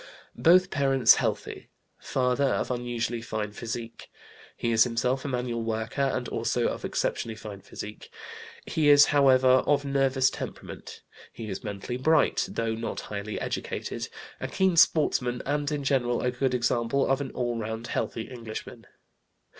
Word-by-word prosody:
Both 180 Hz, +2 st, +5 dB
parents 135 Hz, -4 st, +5 dB
healthy; -, -, -3 dB, 0.3 s
father 130 Hz, +2 st, 0 dB
of 135 Hz, -, 0 dB
unusually 120 Hz, -1 st, -2 dB
fine 110 Hz, -2 st, -4 dB
physique. 115 Hz, +1 st, -7 dB, 0.5 s
He 115 Hz, -, -1 dB
is 115 Hz, 0 st, +6 dB
himself 125 Hz, +2 st, -1 dB
a -, -, -1 dB
manual 125 Hz, -3 st, -2 dB
worker 110 Hz, +3 st, -2 dB
and 135 Hz, -1 st, 0 dB
also -, -, -1 dB
of -, -, -6 dB
exceptionally 115 Hz, -1 st, -2 dB
fine 105 Hz, -2 st, -9 dB
physique. 105 Hz, +2 st, -9 dB, 0.6 s
He 155 Hz, -2 st, +1 dB
is, 145 Hz, 0 st, +8 dB
however, 130 Hz, -2 st, +5 dB, 0.2 s
of 145 Hz, -1 st, +2 dB
nervous 135 Hz, -1 st, +2 dB
temperament. -, -, -8 dB, 0.3 s
He 110 Hz, -2 st, -8 dB
is 95 Hz, -, -6 dB
mentally 105 Hz, +4 st, -4 dB
bright, 155 Hz, +3 st, +3 dB
though 115 Hz, -1 st, -2 dB
not 115 Hz, +1 st, -4 dB
highly 105 Hz, +1 st, -4 dB
educated, -, -, -4 dB, 0.3 s
a -, -, -3 dB
keen 190 Hz, -2 st, +1 dB
sportsman, 125 Hz, -7 st, +3 dB
and 145 Hz, +1 st, -1 dB
in 145 Hz, -1 st, -2 dB
general 125 Hz, -3 st, +1 dB
a 125 Hz, -, +1 dB
good 125 Hz, 0 st, 0 dB
example 120 Hz, +2 st, +1 dB
of 135 Hz, +1 st, +1 dB
an 135 Hz, -, -4 dB
all 120 Hz, -2 st, -2 dB
around 110 Hz, +1 st, -4 dB
healthy 115 Hz, -, -2 dB
Englishman. 115 Hz, -1 st, -8 dB
125 Hz, 150 wpm, -27 LUFS, 115-135 Hz, 0.6 s, is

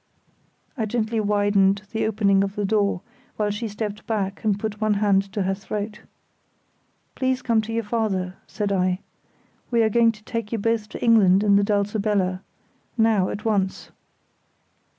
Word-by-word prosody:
I 225 Hz, -5 st, -2 dB
gently 225 Hz, 0 st, -1 dB
widened 205 Hz, -1 st, +2 dB
the 220 Hz, -1 st, 0 dB
opening 200 Hz, -2 st, +3 dB
of 195 Hz, 0 st, -4 dB
the 205 Hz, -, -1 dB
door, 200 Hz, -3 st, +1 dB, 0.4 s
while 210 Hz, -1 st, 0 dB
she 215 Hz, +3 st, -3 dB
stepped 210 Hz, 0 st, -5 dB
back 200 Hz, -3 st, -2 dB
and 205 Hz, -2 st, +1 dB
put 215 Hz, 0 st, -4 dB
one 215 Hz, -1 st, +2 dB
hand 200 Hz, -1 st, +2 dB
to 205 Hz, -3 st, 0 dB
her 190 Hz, +1 st, 0 dB
throat. 210 Hz, +2 st, -5 dB, 1.1 s
"Please 260 Hz, -1 st, -1 dB
come 230 Hz, -2 st, +2 dB
to 220 Hz, +1 st, -7 dB
your 230 Hz, 0 st, -1 dB
father," 205 Hz, -4 st, -1 dB
I -, -, -33 dB
said. 190 Hz, -3 st, 0 dB, 0.7 s
"We 235 Hz, -2 st, +3 dB
are 220 Hz, -, +3 dB
going 230 Hz, +1 st, +4 dB
to 215 Hz, -1 st, -17 dB
take 230 Hz, -2 st, -4 dB
you 230 Hz, -, 0 dB
both 220 Hz, 0 st, -1 dB
to -, -, -7 dB
England 205 Hz, -5 st, +5 dB
in 200 Hz, -1 st, +4 dB
the 200 Hz, -, +4 dB
Dulcibella—now, 205 Hz, +1 st, -1 dB
at 215 Hz, -, -6 dB
once." 200 Hz, -4 st, -1 dB
210 Hz, 160 wpm, -23 LUFS, 200-220 Hz, 1.1 s, England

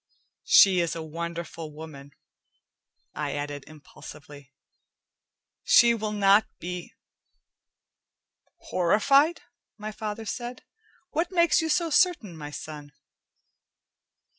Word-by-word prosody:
She 190 Hz, -2 st, +7 dB
is 170 Hz, -1 st, -1 dB
a 165 Hz, -, -5 dB
wonderful 165 Hz, 0 st, -6 dB
woman," 150 Hz, -2 st, -11 dB, 1.0 s
I -, -, -3 dB
added 145 Hz, -1 st, -5 dB
impulsively. 145 Hz, -2 st, -13 dB, 1.1 s
"She 235 Hz, -1 st, +6 dB
will 215 Hz, -2 st, -3 dB
not 205 Hz, 0 st, +4 dB
be 180 Hz, 0 st, -7 dB, 0.8 s
" -, -, -51 dB
"Horrified?" 275 Hz, -, +3 dB, 0.3 s
my 215 Hz, 0 st, -6 dB
father 215 Hz, +1 st, -6 dB
said. 240 Hz, +3 st, -6 dB, 0.5 s
"What 335 Hz, +4 st, -1 dB
makes 340 Hz, -2 st, +3 dB
you 320 Hz, -, -2 dB
so 330 Hz, +1 st, +1 dB
certain, 300 Hz, -, +2 dB
my 150 Hz, -2 st, -8 dB
son?" 150 Hz, -1 st, -9 dB
180 Hz, 100 wpm, -26 LUFS, 155-235 Hz, 1.1 s, She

